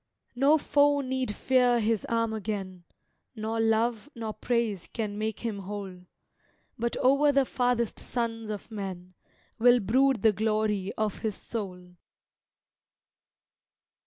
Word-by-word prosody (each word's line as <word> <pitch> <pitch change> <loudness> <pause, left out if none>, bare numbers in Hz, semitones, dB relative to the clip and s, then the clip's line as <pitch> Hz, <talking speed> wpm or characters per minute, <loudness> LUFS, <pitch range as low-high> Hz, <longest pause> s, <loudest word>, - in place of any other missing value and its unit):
No 280 +5 +5
foe 285 -1 +3
need 260 -4 -2
fear 250 -2 +3
his 220 -1 0
arm 230 -1 0
again, 195 -4 -5 0.5
Nor 220 +1 -3
love, 225 +2 +1
nor 225 -2 -4
praise 230 -7 -1
can 215 -3 -4
make 215 0 -3
him 225 -4 -3
whole; 190 -2 -7 0.7
But 235 +1 -2
o'er 280 +3 +4
the 275 -1 +3
farthest 245 -3 0
sons 225 -2 -3
of 210 +1 -6
men 185 -3 -6 0.5
Will 245 +1 +6
brood 255 +3 +2
the 220 -2 +5
glory 215 -2 0
of 215 -2 -1
his 220 -3 -2
soul. 180 -5 -7
220 Hz, 125 wpm, -28 LUFS, 205-245 Hz, 0.7 s, Will